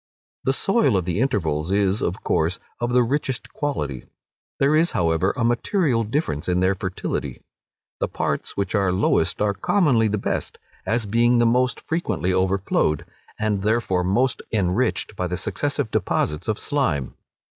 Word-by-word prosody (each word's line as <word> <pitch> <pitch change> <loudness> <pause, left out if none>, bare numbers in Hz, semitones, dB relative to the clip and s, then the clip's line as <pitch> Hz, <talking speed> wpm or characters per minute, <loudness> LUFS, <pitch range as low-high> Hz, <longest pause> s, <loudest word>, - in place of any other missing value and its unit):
The 135 - +3
soil 195 - +2
of 90 - -1
the 90 +2 -1
intervals 85 - 0
is, 100 0 +2
of 90 - -2
course, 80 +3 +1 0.2
of 120 0 -1
the 125 0 +4
richest 135 0 -2
quality: 140 - -3 0.5
there 140 +2 +3
is, 165 +2 +3
however, 85 +2 +2
a 120 - 0
material 120 - +1
difference 110 - -2
in 90 0 +2
their 95 +1 +3
fertility. 95 -1 -4 0.6
The - - 0
parts - - -3
which 100 -2 -1
are 100 -3 +2
lowest 95 +2 +1
are 105 -1 +2
commonly 130 - +2
the 105 0 0
best, - - -3 0.3
as 115 0 +1
being 120 +4 +3
the 120 - +4
most 125 +2 +2
frequently 105 - -1
overflowed, 95 -5 +1 0.3
and 105 -2 0
therefore 105 -4 +1
most 115 +8 +1
enriched 105 +2 0
by 90 -1 -2
the 90 0 -3
successive - - -2
deposits 75 +6 -1
of 110 -2 0
slime. 85 - -1
105 Hz, 155 wpm, -23 LUFS, 90-125 Hz, 0.6 s, the